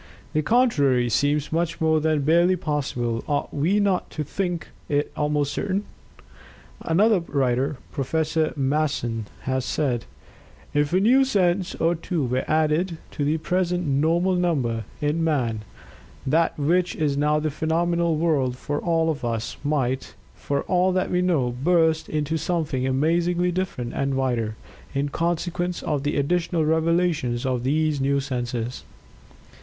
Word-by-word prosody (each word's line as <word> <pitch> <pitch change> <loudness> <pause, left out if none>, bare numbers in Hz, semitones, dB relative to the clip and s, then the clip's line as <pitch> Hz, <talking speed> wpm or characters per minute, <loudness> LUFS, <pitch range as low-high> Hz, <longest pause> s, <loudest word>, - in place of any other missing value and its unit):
The 155 - +2
contrary 145 - +3
seems 145 +3 +1
much 170 +1 -1
more 160 -1 +3
than 155 -1 +1
barely 170 +5 +4
possible; 135 -8 -2
ought 145 -1 -1
we 170 +9 +2
not 200 -3 +1
to 155 - -4
think 175 +2 -3 0.2
it 145 0 0
almost 150 -1 0
certain?" 200 0 -1 1.0
Another 200 +5 +3
writer. 135 -3 0
Prof. 155 +3 -1
Masson, 135 -6 -1
has 130 0 -1
said: 125 -2 -1 0.7
"If 145 0 +1
a 185 - +3
new 250 +7 +5
sense 185 -6 +1
or 165 +1 +2
two 165 -2 -2
were 125 +1 0
added 160 +3 +1
to 145 - -3
the 150 +3 +1
present 180 +1 0
normal 160 +6 +2
number, 135 - 0 0.2
in 150 +3 0
man, 125 -9 0 0.6
that 160 +5 +2
which 175 +5 +1
is 150 -3 0
now 150 +1 +2
the 155 0 -1
phenomenal 170 +2 +1
world 145 -6 +1
for 145 +2 -3
all 165 -1 +1
of 145 -4 -6
us 115 -1 -2
might, 135 -3 -1 0.2
for 140 0 -2
all 185 0 +2
that 185 0 0
we 180 - +2
know, 155 -9 +1
burst 160 -2 +3
into 155 +1 -1
something 155 -7 -1
amazingly 170 +6 +1
different 175 -10 -3
and 135 0 -1
wider, 120 -5 -1 0.4
in 140 +1 0
consequence 175 +2 -2
of 150 -3 -1
the 145 +1 -1
additional 165 +2 +1
revelations 160 -6 +1
of 125 -2 -1
these 150 +1 +1
new 140 +1 +2
senses." 125 -3 -3
155 Hz, 145 wpm, -24 LUFS, 135-170 Hz, 1.0 s, new